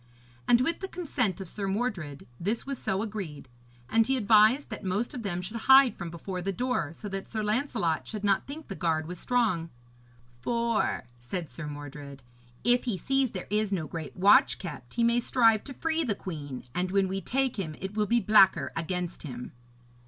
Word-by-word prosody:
And 240 0 +5
with 330 +6 0
the 385 - -4
consent 255 - -1
of 190 - -6
Sir 200 +3 -4
Mordred 195 - -3
this 210 +6 -1
was 275 -2 -4
so 190 +2 -1
agreed; 195 -10 -6 0.4
and 225 0 +3
he 265 0 +2
advised 220 +4 +4
that 215 - -6
most 200 +5 -1
of 250 - -5
them 180 -4 -3
should 215 +6 -5
hide 265 -1 +8
from 175 -2 -6
before 180 +2 -5
the 195 +2 -1
door, 220 - -1
so 185 +5 -8
that 195 0 -4
Sir 220 -2 -3
Lancelot 210 - 0
should 210 -2 -5
not 200 -1 +2
think 300 +3 -8
the 195 - -5
guard 160 -4 0
was 180 0 -6
strong. 215 -10 +1 0.7
'For,' 235 - 0 0.2
said 160 +7 -5
Sir 160 -3 -6
Mordred, 145 -2 -8 0.4
'if 245 +3 +3
he 230 -6 -1
sees 270 +4 +1
there 185 -4 -6
is 210 -1 +1
no 175 -5 -1
great 160 0 -7
watch 195 +3 +6
kept, 135 -9 -8
he 235 - +2
may 235 +1 +4
strive 230 -3 +3
to 275 - -7
free 325 +3 0
the 225 -8 0
queen, 145 -9 -6
and 180 +1 -1
when 195 0 +2
we 195 +1 -3
take 260 +5 0
him 160 -5 -3
it 190 +2 -5
will 210 -1 0
be 235 +2 +3
blacker 210 -4 +5
against 175 +1 -3
him.' 125 -5 -7
200 Hz, 195 wpm, -28 LUFS, 170-235 Hz, 0.7 s, hide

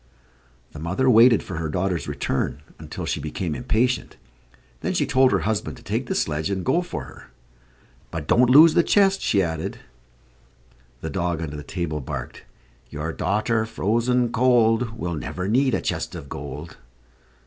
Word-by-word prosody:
The 75 - -10
mother 95 +11 -1
waited 115 -1 +6
for 95 - -6
her 80 -1 -3
daughter's 90 -1 -1
return 70 +2 -2 0.2
until - - -6
she - - -2
became 80 +2 -3
impatient; 115 - 0 0.6
then - - -2
she - - +2
told 130 0 +4
her - - +1
husband 105 -1 -2
to - - -16
take - - -2
the - - -2
sledge 75 +1 -1
and 95 -2 -2
go 150 +7 +2
for 75 - -5
her. - - -14 0.8
"But 80 -3 -5
don't 125 0 +4
lose 155 +5 +8
the - - +5
chest," 195 +2 +3
she 100 -3 +2
added. 80 -2 -3 1.2
The 80 - -4
dog 85 -3 -1
under 75 -3 -5
the 75 - -6
table, 75 0 -4
barked: 65 - -7 0.4
"Your 75 +2 -4
daughter 105 +5 0
frozen 120 +3 +1
cold, 115 -2 +2
Will 85 -6 -3
never 90 +4 -4
need 130 +3 +2
a - - -2
chest - - -3
of 70 - -8
gold." 75 +4 -8
95 Hz, 165 wpm, -23 LUFS, 80-120 Hz, 1.2 s, lose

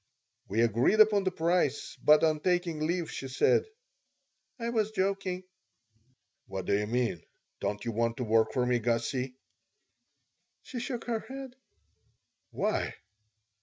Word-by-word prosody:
We 110 +4 +1
agreed 120 - +3
upon 210 -2 +6
the 185 - +2
price, 165 -4 0
but 150 +1 +6
on 155 -1 +3
taking 175 -1 0
leave 170 -1 -1
she 135 - -5
said, 130 - +3 0.9
"I 235 -1 -3
was 220 -3 +1
joking." 190 -2 -1 1.0
"What 95 -1 -5
do - - +1
you 105 +1 0
mean? 120 -6 0 0.4
Don't 105 0 -3
you 115 - -1
want 115 +1 0
to 125 - -2
work 110 -1 +3
for 125 -1 +1
me, 125 -1 +2
Gussie?" 120 +3 -1 1.3
She 250 - -6
shook 245 0 -4
her 230 -2 -1
head 265 +1 -8 0.9
"Why?" - - -1
155 Hz, 135 wpm, -30 LUFS, -, 1.3 s, upon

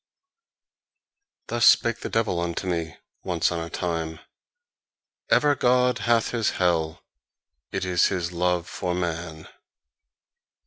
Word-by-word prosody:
Thus 120 0 +2
spake 115 -1 +4
the - - -5
devil 110 -6 0
unto 85 +2 -3
me, 85 -3 -3 0.3
once 90 -3 0
on 85 - -2
a 85 0 -5
time: 80 -3 -3 1.1
"Even 145 -1 +4
God 125 0 +3
hath 115 -1 +2
his 115 -3 +1
hell: 80 -3 0 0.7
it - - -2
is 90 -2 +3
his 90 -3 -2
love 90 0 0
for 90 -2 -3
man." 85 -2 -4
90 Hz, 120 wpm, -25 LUFS, 85-110 Hz, 1.1 s, spake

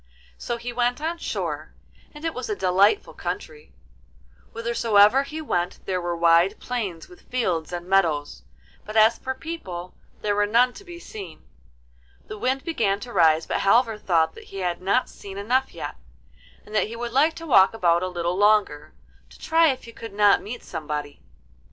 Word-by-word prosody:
So 240 - -3
he 240 +1 -6
went 245 +1 0
on 330 +2 -3
shore, - - -4 0.4
and 300 +2 -10
it 325 - -1
was 250 -2 -5
a 210 - -1
delightful 190 - +2
country; 460 -2 -6 0.8
whithersoever 230 0 +3
he 305 +3 -6
went 175 - -1
there 185 -1 -1
were 175 0 -2
wide 170 +4 +4
plains 200 -10 -4
with 180 - -18
fields 180 -11 -1
and 175 0 -5
meadows, 160 - +1 0.4
but 215 +1 -5
as 220 +1 +5
for 260 0 -4
people, 190 - -7 0.3
there 205 - 0
were 205 0 +2
none 245 +4 +3
to 400 - -12
be 345 -2 -10
seen. 195 - -10 0.8
The 215 - -8
wind 260 +3 0
began 225 - 0
to 240 +1 -8
rise, 160 -3 +4
but - - -1
Halvor 225 +2 +3
thought 165 -5 +1
that - - -13
he 195 - -10
had 175 -1 -2
not 200 +7 +1
seen 195 -1 -10
enough 250 +6 0
yet, - - -7 0.7
and 210 - -13
that 215 - +2
he 230 - -7
would 235 0 -5
like 305 +5 +3
to 330 - -8
walk 225 -8 +5
about 175 -5 +2
a 185 - -1
little 175 -1 -2
longer, 205 -7 +2 0.3
to - - -16
try 325 +1 +3
if 265 -4 -1
he 230 - -11
could 230 -2 -10
not 205 0 +4
meet 235 +3 -7
somebody. 150 -2 -5
210 Hz, 180 wpm, -24 LUFS, 180-250 Hz, 0.8 s, as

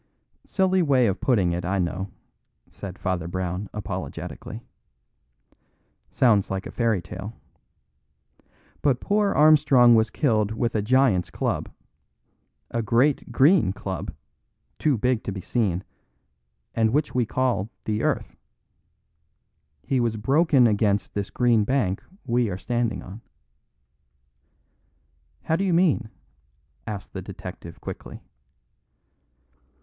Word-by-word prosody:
"Silly 190 -1 +2
way 135 -6 +3
of 100 -4 -1
putting 100 -9 +2
it, 85 +1 -2
I 95 +3 -1
know," 95 +2 -2 0.6
said 95 -2 -8
Father 90 -3 -2
Brown 90 +2 -3
apologetically. 105 -1 -6 1.5
"Sounds 110 -6 +3
like 95 0 -3
a - - -7
fairy 115 -7 0
tale. 100 +5 -7 1.5
But 135 -4 +2
poor 205 0 +1
Armstrong 145 -6 +6
was 110 -1 +4
killed 110 -8 +1
with 115 +1 -1
a 110 - +1
giant's 110 -5 +2
club, - - -2 1.0
a 115 - -1
great 120 +6 +1
green 135 - +4
club, 95 -3 -5 0.7
too 145 -5 +2
big 125 +1 0
to - - -2
be 95 - -5
seen, 95 -3 -1 0.9
and 110 -1 +2
which 150 +1 0
we 125 - +2
call 125 -6 0 0.2
the 105 -1 -1
earth. - - -1 1.5
He 135 - 0
was 115 -2 0
broken 140 +3 +3
against 105 -2 +1
this 100 -1 -3
green 120 -3 +3
bank 105 -5 0 0.2
we 120 -2 +1
are 90 - -3
standing 120 +1 -2
on." 100 +5 -10 2.2
"How 160 - +1
do 190 - 0
you 185 -3 +2
mean?" 155 -10 +2 0.8
asked 100 -2 -6
the - - -5
detective 85 0 -9
quickly. - - -8
115 Hz, 120 wpm, -24 LUFS, 100-130 Hz, 2.2 s, Armstrong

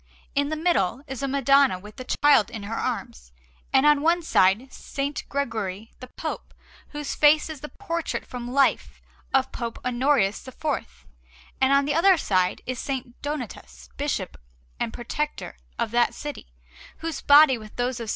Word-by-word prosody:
In 285 +1 +1
the 310 - -1
middle 290 - +1
is 265 -3 -6
a 275 - -1
Madonna 275 -4 +4
with 210 +3 -13
the 255 - -6 0.2
Child 285 -8 +6
in 225 -4 -7
her 210 +3 -5
arms, - - -4 0.4
and 265 +1 +4
on 295 -1 +5
one 335 +3 +2
side 190 - +4
S. 265 - -14 0.3
Gregory 225 -6 -3
the 255 - -9
Pope, 315 +5 -6 0.3
whose 295 -1 -5
face 305 +1 +4
is 300 -4 -9
the 300 - -7
portrait 335 -4 -4
from 245 -1 -7
life 275 +1 +1 0.3
of 265 -1 +2
Pope 235 -2 -5
Honorius 250 -3 +1
IV; 255 - -4 0.6
and 265 0 +4
on 280 0 +4
the 290 - 0
other 365 +4 +5
side 185 - 0
is 255 +2 -5
S. 265 -2 -1 0.2
Donatus, 220 - -6
Bishop - - -3 0.4
and - - -1
Protector 295 +6 -4 0.2
of 230 -2 -1
that 240 0 +2
city, 295 -1 -7 0.5
whose 325 -2 -4
body, 285 -3 +7
with 215 -1 -12
those 245 0 -1
of 230 - -4
S. - - -7
265 Hz, 170 wpm, -25 LUFS, 225-295 Hz, 0.6 s, body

